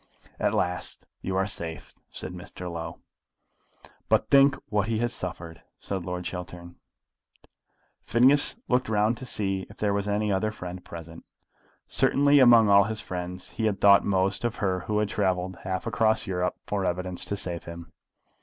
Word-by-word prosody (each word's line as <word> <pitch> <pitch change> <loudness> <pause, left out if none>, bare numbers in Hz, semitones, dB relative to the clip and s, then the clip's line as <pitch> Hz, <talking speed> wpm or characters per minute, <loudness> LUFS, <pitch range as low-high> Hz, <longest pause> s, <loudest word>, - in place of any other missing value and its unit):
"At - - +1
last 90 0 -2 0.2
you 95 - -3
are 95 0 +2
safe," 80 -5 -5 0.2
said 95 - -7
Mr. 90 0 -8
Low. 80 -1 -6 1.1
"But - - +2
think 140 0 +6
what 105 -1 0
he 115 -1 0
has 120 +1 -1
suffered," 85 -2 -6 0.2
said 95 -3 -4
Lord 90 0 -4
Chiltern. 90 -1 -7 1.2
Phineas 135 - +4
looked 125 -2 +1
round 110 +2 +2
to 130 - -8
see 95 -4 -2
if - - -14
there 105 -1 0
was 100 0 -1
any 105 0 0
other 100 +3 +1
friend 90 -3 -8
present. 85 0 -10 0.6
Certainly 145 +1 +4
among 120 -4 +7
all 100 -1 +6
his 110 +1 -3
friends 90 -1 -6
he 110 - -2
had 105 -2 0
thought 100 -1 +6
most 95 +1 0
of 120 -1 -1
her 95 -2 0
who 105 - 0
had 105 -1 +1
travelled 95 -2 -1
half 95 +1 -2
across 110 -2 +2
Europe 90 -1 -1
for 100 -2 -2
evidence 90 0 -2
to 100 - -3
save 85 -3 -4
him. 85 0 -9
95 Hz, 165 wpm, -26 LUFS, 90-110 Hz, 1.2 s, among